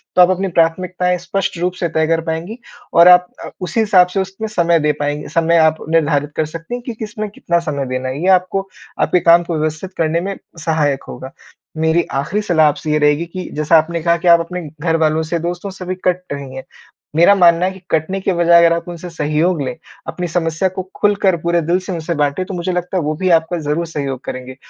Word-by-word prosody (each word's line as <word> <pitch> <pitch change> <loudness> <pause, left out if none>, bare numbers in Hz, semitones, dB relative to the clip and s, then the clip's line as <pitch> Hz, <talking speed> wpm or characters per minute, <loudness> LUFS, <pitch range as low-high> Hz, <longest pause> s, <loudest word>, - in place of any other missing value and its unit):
तो 180 - +6
आप 180 - +6
अपनी 185 +1 0
प्राथमिकताएँ 180 +2 0
स्पष्ट 185 0 -3
रूप 180 +1 -1
से 170 - -1
तय 160 -1 0
कर 165 0 +1
पाएँगी 165 +7 -4 0.4
और 170 +1 +7
आप 180 0 +7 0.2
अ, - - -7
उसी 180 +5 -2
हिसाब 190 -5 +5
से 195 +2 -3
उसमें 195 +3 -5
समय 170 -5 +2
दे 150 0 +2
पाएँग 145 +1 -2
समय 165 0 +2
आप 160 0 +4
निर्धारित 145 -3 +1
कर 155 - 0
सकती 165 +7 -8
हैं 245 - -6
कि 240 - -4
किसमें 215 -1 -6
कितना 170 -4 -1
समय 145 -5 -3
देना 130 0 -3
है। 140 +5 -5
ये 185 - -1
आपको, 190 +1 +2 0.3
आपके 180 - +2
काम 170 +1 +5
को 170 -2 -3
व्यवस्थित 155 +5 -3
करने 165 +1 0
में 195 +1 -4 0.3
सहायक 150 -4 0
होगा। 130 +2 -8 0.5
मेरी 160 +2 +2 0.2
आखिरी 170 +10 -1
सलाह 160 -6 +3
आपसे 150 +1 -2
ये 150 - +2
रहेगी 150 +2 +2
कि 180 +2 -7
जैसा 155 +2 +3
आपने 165 +1 0
कहा 170 0 +3
कि 175 +1 -4
आप 170 0 +7
अपने 180 +2 -5 0.2
घरवालों 160 -1 +1
से, 165 +2 -2
दोस्तों 175 +4 -4
से 185 -1 -9
भी 185 +1 -3
कट 180 0 +1
रही 140 -2 -7
हैं। 130 - -7 0.5
मेरा 175 +5 +6
मानना 175 -1 +4
है 190 - 0
कि 190 - -12
कटने 175 +5 0
की 190 - 0
बजाय 170 0 +5
अगर 170 - +4
आप 170 +1 -5
उनसे 175 +1 -7
सहयोग 155 +1 0
लें, 130 -2 -3 0.3
अपनी 180 -1 -4
समस्या 165 +2 -1
को 185 - -2 0.2
खुलकर 200 -3 +2
पूरे 170 0 +1
दिल 170 +4 +1
से 190 +1 -7
उनसे 165 0 -3
बाँटे, 145 +6 -1
तो 195 - -7
मुझे 180 +1 -2
लगता 180 +1 -2
है, 175 - 0
वो 155 +1 -1
भी 185 +4 -1
आपका 170 +2 -5
ज़रूर 155 +3 -2
सहयोग 140 -5 -4
करेंगे। 130 0 -7
170 Hz, 230 wpm, -17 LUFS, 155-180 Hz, 0.5 s, और